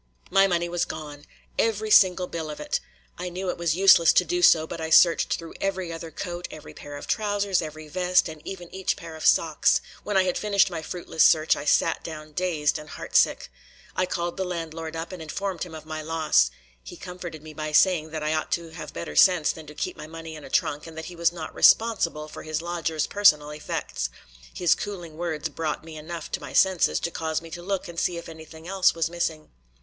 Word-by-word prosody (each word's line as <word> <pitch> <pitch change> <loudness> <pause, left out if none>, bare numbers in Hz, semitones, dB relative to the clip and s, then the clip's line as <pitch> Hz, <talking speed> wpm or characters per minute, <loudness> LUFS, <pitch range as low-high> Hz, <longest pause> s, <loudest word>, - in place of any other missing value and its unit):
My 195 0 +5
money 175 -2 0
was 175 0 -1
gone! 150 -2 -7 0.3
Every 215 -1 +1
single 185 -2 +6
bill 165 -3 -5
of 150 - -7
it. 150 - -1 0.4
I 180 0 -3
knew 180 +1 -3
it - - -8
was 170 -2 +1
useless 185 -3 +7
to - - +4
do 355 0 -1
so, 160 - +6
but 160 - -7
I 160 - -3
searched 170 +1 +5
through 165 -1 -9
every 190 -3 -2
other 165 0 -7
coat, 175 +2 -5
every 155 - -11
pair 145 0 -9
of - - -8
trousers, 205 -3 0
every 155 -1 -7
vest, 180 +3 +2
and 155 -2 -9
even 180 -3 -8
each 190 0 -1
pair 165 -1 -9
of 160 - -8
socks. 160 -2 +4 0.2
When 205 -2 0
I 190 - +5
had 180 -1 -1
finished 200 -2 +3
my 165 -2 -4
fruitless 160 -1 0
search, 155 0 +5
I 145 - -6
sat 165 +2 +2
down 155 -1 -8
dazed 160 -3 0
and 150 0 -11
heartsick. - - +1 0.5
I 185 - +1
called 175 0 -3
the 190 - 0
landlord 165 -2 -5
up 165 +2 -5
and 185 -3 -8
informed 180 +3 -4
him 170 -3 -5
of 155 -1 -10
my 155 0 -5
loss; 155 - +2 0.3
he - - -10
comforted 175 -4 -8
me 155 0 -10
by 155 0 -4
saying 160 0 +4
that 155 -1 -5
I 155 +1 0
ought 155 - -2
to 170 -1 -2
have 160 - -8
better 80 -3 -6
sense 175 - +5
than 160 -1 -11
to 150 - -11
keep - - -4
money 165 +1 -8
in 155 - -10
a - - -10
trunk 150 +2 0
and 160 -1 -11
that 160 - -5
he - - -11
was 170 0 +2
not 165 -2 -7
responsible 185 -9 +3
for 155 - -9
his 155 -1 -3
lodgers' 165 -2 -2
personal 150 -8 +4
effects. 150 - -4 0.4
His 175 -2 +3
cooling 175 -6 -6
words 160 -2 -3
brought 155 -2 -3
me 160 -1 -10
enough 160 +1 -7
to - - -3
my 140 -3 -8
senses 190 -3 +3
to 170 - -2
cause 160 -1 -2
me 165 0 -12
to 175 - -6
look 195 +1 -3
and 170 -1 -5
see 175 - 0
if 170 - -8
anything 160 0 -11
else 190 -1 +3
was 165 -1 +1
missing. 165 -2 -3
165 Hz, 225 wpm, -25 LUFS, 155-180 Hz, 0.5 s, useless